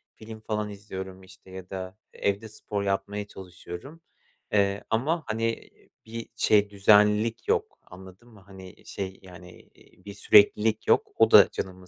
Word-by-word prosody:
film 110 0 -11
falan 105 -1 -3
izliyorum, 95 -2 -9
işte, 95 0 -17
ya 95 -1 -10
da 95 0 -7 0.2
evde 100 +2 -2
spor 105 -1 -5
yapmaya 100 +1 -3
çalışıyorum. 95 - -11 0.5
Eee, 100 0 +1
ama, 150 +9 0
hani, 115 +1 -3 0.4
bir 115 +1 -8
şey, 105 -1 +3
düzenlilik 105 +2 +3
yok - - -1
anladın 95 +5 -15
mı? 105 -3 -17
Hani, 95 -1 -13
şey, 95 -1 -6
yani, 90 -1 -13
eee, - - -22
bir 100 - -8
süreklilik 105 +2 +4
yok. - - +3
O - - +3
da - - +8
canımı 95 -1 -7
100 Hz, 145 wpm, -26 LUFS, 95-110 Hz, 0.5 s, da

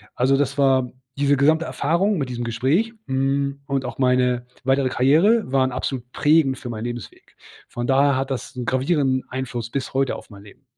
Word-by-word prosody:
Also, 135 +2 +2
das 140 -1 -1
war 130 -3 +2 0.3
diese 140 0 +3
gesamte 155 +4 +3
Erfahrung 175 +9 0
mit 135 -5 -2
diesem 120 -1 -4
Gespräch, 135 - 0
hm, 135 +1 0
und 140 -2 -1
auch - - -6
meine 125 -1 +2 0.2
weitere 135 0 +2
Karriere 160 - +3
waren 130 -1 +2
absolut 125 -1 -4
prägend 145 -3 +3
für 125 - -8
meinen 115 0 -5
Lebensweg. 120 -2 -8 0.3
Von 120 0 -5
daher 140 +1 +3
hat 135 +1 -2
das 135 +2 -5
'n 125 - -4
gravierenden 130 0 +1
Einfluss 125 -3 -4
bis 135 +2 -4
heute 135 0 0
auf - - -11
mein 100 -2 -13
Leben. 105 +6 -17
135 Hz, 185 wpm, -22 LUFS, 125-140 Hz, 0.3 s, diese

